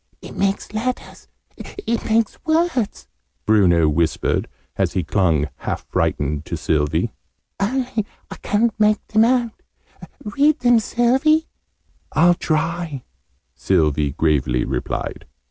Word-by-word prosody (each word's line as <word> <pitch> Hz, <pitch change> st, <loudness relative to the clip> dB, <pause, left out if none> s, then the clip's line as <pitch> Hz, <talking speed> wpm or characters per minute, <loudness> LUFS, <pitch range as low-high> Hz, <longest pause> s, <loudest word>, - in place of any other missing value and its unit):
"It -, -, -11 dB
makes 195 Hz, +1 st, -1 dB
letters! 250 Hz, +4 st, -4 dB, 0.3 s
It 235 Hz, -, -4 dB
makes 225 Hz, -1 st, 0 dB
words!" 315 Hz, -8 st, 0 dB, 0.4 s
Bruno 90 Hz, -7 st, +4 dB
whispered, 80 Hz, +2 st, 0 dB, 0.3 s
as -, -, 0 dB
he 90 Hz, -, 0 dB
clung, 80 Hz, -3 st, +1 dB
half -, -, -4 dB
frightened, 75 Hz, +1 st, -1 dB
to 85 Hz, -, -4 dB
Sylvie. 75 Hz, -1 st, 0 dB, 0.5 s
"Only 230 Hz, 0 st, -1 dB, 0.2 s
I -, -, -7 dB
ca'n't 220 Hz, +1 st, 0 dB
make 210 Hz, 0 st, +2 dB
them 220 Hz, +1 st, +4 dB
out! 240 Hz, -2 st, 0 dB, 0.6 s
Read 285 Hz, +8 st, +2 dB
them, 245 Hz, -1 st, +5 dB
Sylvie!" 265 Hz, +8 st, +2 dB, 0.7 s
"I'll 175 Hz, +3 st, +5 dB
try," 160 Hz, -3 st, -2 dB, 0.5 s
Sylvie 75 Hz, -6 st, +1 dB
gravely 70 Hz, -6 st, +1 dB
replied. -, -, -4 dB
195 Hz, 110 wpm, -21 LUFS, -, 0.7 s, them